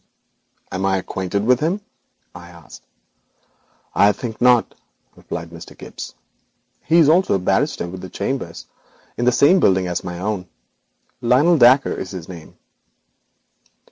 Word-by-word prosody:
'Am 95 - -3
I 95 0 +2
acquainted 95 +2 -3
with 125 +1 +4
him?' 170 +7 -1 0.5
I 85 0 -12
asked. 85 -4 -14 1.1
'I 100 +1 +4
think 115 -3 -7
not,' 125 -2 +4 0.4
replied 85 0 -7
Mr. 85 0 -12
Gibbes; - - -9 0.7
'he 165 -2 +4
also 170 - +3
is - - +3
a - - -5
barrister 90 -1 0
with 95 +1 -9
chambers 100 -6 -4 0.5
in 120 - -2
the 125 - +5
same 145 +10 +4
building 95 - +3
as 90 -1 -3
my 90 -1 -6
own. 95 0 -3 0.7
Lionel 145 +8 +3
Dacre 130 +3 +5
is 95 - -6
his 90 -4 -8
name.' 85 -4 -12
100 Hz, 140 wpm, -20 LUFS, 90-125 Hz, 1.1 s, the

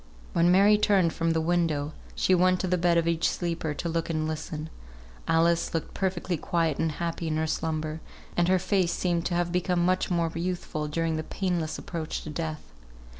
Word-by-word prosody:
When 170 +1 +4
Mary 200 +3 +6
turned 190 -6 +3
from 165 -1 0
the 160 - +1
window, 160 -3 0 0.2
she 185 - +2
went 185 0 +4
to 185 - -1
the 180 - +2
bed 175 -1 +3
of 165 0 +2
each 165 -1 +2
sleeper, 165 -3 -2
to 170 - -3
look 165 0 -1
and 155 -1 -1
listen. 155 0 -5 0.6
Alice 165 +1 +2
looked 165 - -3
perfectly 185 -2 -1
quiet 165 -1 0
and 160 -1 0
happy 170 +1 -3
in 155 -1 0
her 160 - +1
slumber, 160 0 -2 0.3
and 175 0 +2
her 185 +1 +4
face 185 -1 +1
seemed 175 -2 0
to 175 - -2
have 175 0 0
become 180 -1 +1
much 185 +1 +1
more 170 -2 +1
youthful 170 -3 -3
during 160 +1 -1
her - - -1
painless 175 -2 -2
approach 165 -2 -5
to 155 - -6
death. 155 0 -4
170 Hz, 195 wpm, -27 LUFS, 160-180 Hz, 0.6 s, Mary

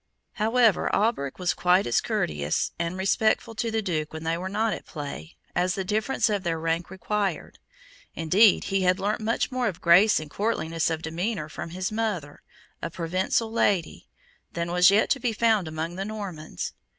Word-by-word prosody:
However, 225 -1 +3
Alberic 205 - 0
was 180 -2 0
quite 180 +2 +3
as 120 - +2
courteous 75 0 -1
and 170 +2 -2
respectful 215 +4 +1
to 230 +1 -2
the 220 -1 -1
Duke 155 -5 -2
when 160 0 -6
they 165 +1 0
were 185 +2 -4
not 215 +2 0
at - - -8
play, 150 +1 -7 0.2
as 180 0 +1
the 195 - -2
difference 215 +7 0
of 205 -3 0
their 170 -3 -1
rank 165 +1 -2
required; 195 -1 -3 0.6
indeed, 185 +6 +4
he 195 -1 0
had 185 +1 +2
learnt 205 +3 -1
much 225 +5 0
more 255 -1 0
of 180 -5 -4
grace 180 +5 +5
and 155 - -7
courtliness 165 -6 -1
of 160 0 -3
demeanour 170 0 -3
from 165 - -6
his 185 +4 -3
mother, 210 -10 -3 0.4
a 165 - -3
Provencal 185 +7 -1
lady, 195 -7 0 0.5
than 170 0 -3
was 180 +1 +6
yet 205 +3 +3
to 275 - +2
be 240 -2 -1
found 220 -5 +2
among 160 +3 -4
the 195 - -3
Normans. 190 - -6
185 Hz, 180 wpm, -26 LUFS, 165-215 Hz, 0.6 s, was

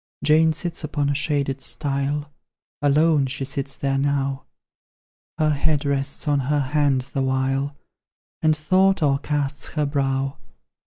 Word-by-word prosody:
Jane 160 +1 +5
sits 165 +1 -3
upon 145 -1 -1
a - - +1
shaded 140 -2 0
stile, 145 +1 -2 0.5
Alone 145 0 +3
she 135 +1 -4
sits 135 0 -3
there 135 0 0
now; 140 -1 -1 0.9
Her 155 -1 +2
head 150 0 0
rests 140 +2 -2
on 145 -1 +3
her 145 +2 +1
hand 145 -3 +3
the 135 - 0
while, 135 +2 0 0.6
And 155 -1 +4
thought 185 +3 +3
o'ercasts 140 -1 -1
her 150 -1 +1
brow. 135 -1 -1
140 Hz, 130 wpm, -23 LUFS, 135-150 Hz, 0.9 s, Jane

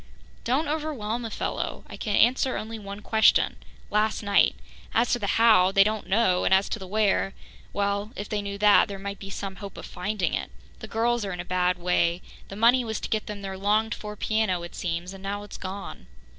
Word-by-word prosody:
"Don't 270 +6 +1
overwhelm 270 -7 -2
a - - -3
fellow. - - -3
I - - -9
can 210 -3 -2
answer 255 +2 +3
only 225 +1 -5
one 200 0 -8
question 220 +1 +3 0.3
last 215 +1 +1
night. 200 -1 +3 0.4
As 230 +2 +3
to 245 - +2
the 200 - -2
'how,' 215 -5 +6
they 195 0 +6
don't 215 +1 -2
know, 190 -3 +2
and - - +1
as 190 +1 +2
to 225 - -3
the 190 - -8
'where' 200 -1 +1 0.4
well, 200 +1 -1
if 205 - -5
they 210 -1 -2
knew 200 0 -5
that, 205 0 +6
there 200 -1 -6
might 200 +1 -6
be 195 - -8
some 195 -1 -5
hope 200 -2 -9
of - - -7
finding 190 +1 -2
it. - - -2 0.3
The - - -8
girls 235 +1 0
are 195 -2 -3
in 180 - -6
a 175 - -4
bad 180 0 +1
way. 175 0 +1 0.2
The 195 - -8
money 240 +4 +4
was 220 -2 -3
to - - -5
get 215 -1 -1
them 205 -1 -6
their 190 -1 -5
longed 215 +3 +2
for 210 0 -7
piano, 210 -5 0
it 170 - -8
seems, 175 +1 -3
and 195 - -11
now 200 +1 -4
it's 205 - -9
gone." 195 +1 -7
205 Hz, 220 wpm, -26 LUFS, 195-220 Hz, 0.4 s, how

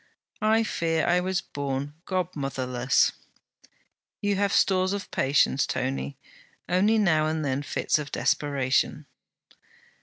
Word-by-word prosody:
'I 220 +1 +3
fear 165 -6 0
I 175 +1 +3
was 190 +1 -1
born 140 -1 -4
godmotherless.' 135 -8 0 1.1
'You 205 0 0
have 200 +1 +1
stores 185 0 +2
of 200 -1 -5
patience, 135 0 +2
Tony; 70 +1 -3 0.5
only 205 +5 +3
now 160 -7 +3
and 155 -1 -1
then 135 0 -1
fits 145 - 0
of 145 -1 -6
desperation.' 135 -3 0
155 Hz, 115 wpm, -26 LUFS, 135-190 Hz, 1.1 s, I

